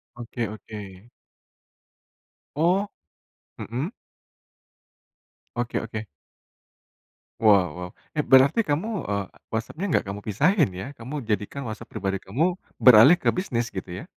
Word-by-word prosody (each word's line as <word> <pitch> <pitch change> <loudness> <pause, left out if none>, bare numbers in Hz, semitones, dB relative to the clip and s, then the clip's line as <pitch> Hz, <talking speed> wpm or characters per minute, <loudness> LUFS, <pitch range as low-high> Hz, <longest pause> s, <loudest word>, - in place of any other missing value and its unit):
Oke 120 0 -7
oke. 105 -1 -10 1.5
Oh, 180 +6 +2 0.7
mhm. 130 - -3 1.7
Oke 120 -1 -1
oke. 110 0 -6 1.4
Wow 100 -4 +6
wow, 90 0 -6 0.2
eh, 150 - +1
berarti 135 - +5
kamu, 155 +9 0 0.2
eee, 100 -1 -1 0.2
WhatsApp-nya 115 - -3
nggak 155 - +1
kamu 100 +1 -5
pisahin 150 - +2
ya? 90 +1 -7
Kamu 135 +4 -7
jadikan 110 +5 -2
WhatsApp 110 -2 -7
pribadi 95 0 -3
kamu, 150 - 0 0.2
beralih 125 +8 +8
ke - - +1
bisnis 120 - -2
gitu 95 -1 -6
ya? 90 - -6
115 Hz, 115 wpm, -25 LUFS, 100-150 Hz, 1.7 s, beralih